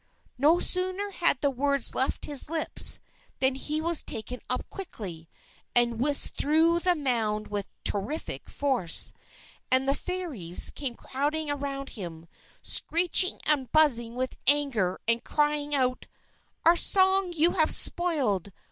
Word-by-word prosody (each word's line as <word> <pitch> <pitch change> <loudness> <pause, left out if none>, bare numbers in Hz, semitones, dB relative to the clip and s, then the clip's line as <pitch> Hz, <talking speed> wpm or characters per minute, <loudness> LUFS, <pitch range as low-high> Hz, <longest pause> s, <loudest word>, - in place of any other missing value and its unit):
_" - - -42 0.3
No 305 +7 +3
sooner 370 +3 -1
had 340 -8 0
the 285 - +1
words 280 0 +1
left 260 - -2
his 290 -1 +3
lips, 320 -1 0 0.4
than 265 0 +1
he 300 +3 -4
was 335 0 +1
taken 245 +3 -6
up 250 - -3
quickly, 185 - -8 0.5
and 240 -1 +2
whisked 285 +3 +1
through 320 +3 +2
the 360 0 +2
mound 225 -7 -1
with 205 -1 -4 0.2
terrific 210 +11 -3
force. 260 -12 +1 0.6
And 260 +1 +4
the 275 - +2
Fairies 285 - -1
came 265 -5 -6
crowding 290 +4 -3
around 275 -1 -5
him, 170 -5 -9 0.4
screeching 355 +2 +3
and 280 -4 0
buzzing 240 -7 +3
with 255 +1 -4
anger, 270 -11 0
and 230 0 +1
crying 295 -1 -1
out: 255 -2 -1 0.6
"_Our 340 +1 +5
song 380 -1 +3
you 335 +1 +2
have 315 -4 +2
spoiled! 260 - +3
280 Hz, 140 wpm, -26 LUFS, 240-320 Hz, 0.6 s, Our